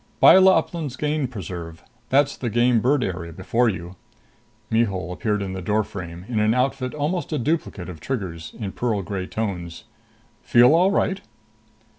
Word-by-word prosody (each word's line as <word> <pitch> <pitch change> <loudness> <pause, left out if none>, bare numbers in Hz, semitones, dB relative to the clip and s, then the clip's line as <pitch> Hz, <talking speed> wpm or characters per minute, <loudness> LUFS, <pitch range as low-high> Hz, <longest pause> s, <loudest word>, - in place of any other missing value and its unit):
"Byla 190 -1 +8
Uplands 160 -5 -3
Game 150 0 -1
Preserve. 85 -7 -7 0.3
That's 140 +1 +3
the 120 - -3
game 120 +1 +3
bird 130 +4 +2
area 85 -3 -4
before 115 +8 +1
you." 90 -2 -6 0.7
Mihul 100 -6 0
appeared 105 +2 -1
in 95 -1 -4
the 95 - -5
doorframe, 95 -3 -3
in 115 -3 -1
an 110 +2 +2
outfit 130 +1 -1
almost 160 +5 -2
a 155 - 0
duplicate 140 - -2
of 90 -4 -8
Trigger's, 90 - -5
in 105 -5 -4
pearl 110 -2 -1
gray 95 0 -4
tones. 90 -6 -4 0.6
"Feel 120 +4 +5
all 180 +4 +4
right?" 195 0 0
110 Hz, 155 wpm, -23 LUFS, 95-135 Hz, 0.7 s, Byla